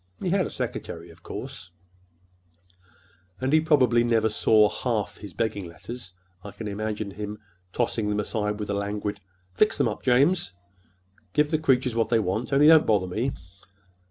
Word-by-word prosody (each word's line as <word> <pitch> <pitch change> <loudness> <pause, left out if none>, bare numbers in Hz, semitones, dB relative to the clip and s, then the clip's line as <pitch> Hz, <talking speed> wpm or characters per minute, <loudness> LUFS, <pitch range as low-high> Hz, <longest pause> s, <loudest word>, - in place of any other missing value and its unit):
He 180 - -2
had 190 -1 +2
a - - -7
secretary, 85 0 -5
of 80 0 -19
course, - - -7 1.7
and 130 +2 -1
he 155 - +6
probably 125 -7 +4
never 115 -2 +2
saw 110 0 +4
half 110 0 -2
his 105 -2 -9
begging 100 0 -2
letters. 95 +5 -9 0.3
I 105 - -7
can 105 +2 -7
imagine 105 0 -3
his 105 +1 -5 0.4
tossing 115 -2 -1
them 105 0 0
aside 105 0 -2
with 105 -1 -3
a - - 0
languid 100 0 -3 0.3
'Fix 95 - +2
them - - +2
up, - - -4
James,—give 95 - -1
the 155 - +2
creatures 130 -5 +2
what 115 -1 +1
they 115 - +4
want, 110 +4 -1
only 140 +2 +5
don't 160 0 +7
bother 105 -4 +3
me. 110 +9 -1
110 Hz, 160 wpm, -26 LUFS, 100-125 Hz, 1.7 s, don't